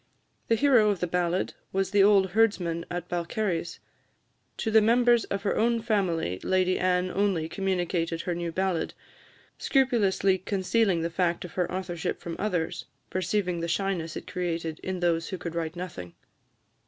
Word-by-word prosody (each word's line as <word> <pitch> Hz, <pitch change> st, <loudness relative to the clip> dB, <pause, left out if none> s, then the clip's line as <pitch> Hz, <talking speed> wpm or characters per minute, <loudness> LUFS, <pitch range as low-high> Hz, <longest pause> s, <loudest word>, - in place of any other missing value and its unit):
The 230 Hz, -, +3 dB
hero 240 Hz, -4 st, +4 dB
of 200 Hz, -3 st, 0 dB
the 180 Hz, -, 0 dB
ballad 180 Hz, +1 st, 0 dB, 0.2 s
was 190 Hz, 0 st, -1 dB
the 205 Hz, -1 st, +4 dB
old 195 Hz, -2 st, +5 dB
herdsman 180 Hz, -6 st, +1 dB
at 175 Hz, -1 st, -4 dB
Balcarres. 175 Hz, 0 st, -2 dB, 0.8 s
To 220 Hz, -, -2 dB
the 220 Hz, 0 st, +6 dB
members 240 Hz, +1 st, +4 dB
of 200 Hz, 0 st, -3 dB
her 205 Hz, -, 0 dB
own 235 Hz, +1 st, +2 dB
family 175 Hz, -, 0 dB
Lady 185 Hz, 0 st, +1 dB
Anne 180 Hz, 0 st, +1 dB
only 195 Hz, -6 st, 0 dB
communicated 175 Hz, -3 st, -1 dB
her 175 Hz, -, -2 dB
new 170 Hz, 0 st, -3 dB
ballad 185 Hz, -1 st, -1 dB, 0.6 s
scrupulously 205 Hz, -8 st, +2 dB
concealing 195 Hz, -1 st, +1 dB
the 170 Hz, +1 st, -2 dB
fact 175 Hz, 0 st, 0 dB
of 175 Hz, -, -9 dB
her 180 Hz, -2 st, -1 dB
authorship 180 Hz, -2 st, -3 dB
from 170 Hz, -1 st, -6 dB
others, 180 Hz, -6 st, -2 dB, 0.3 s
"perceiving 185 Hz, -1 st, -1 dB
the 170 Hz, -, -2 dB
shyness 175 Hz, -2 st, -1 dB
it -, -, -6 dB
created 170 Hz, -3 st, -3 dB
in 185 Hz, -1 st, -4 dB
those 165 Hz, -1 st, +1 dB
who 190 Hz, -, -4 dB
could 170 Hz, -1 st, -6 dB
write 165 Hz, 0 st, -3 dB
nothing." 135 Hz, -, -7 dB
185 Hz, 160 wpm, -27 LUFS, 170-200 Hz, 0.8 s, the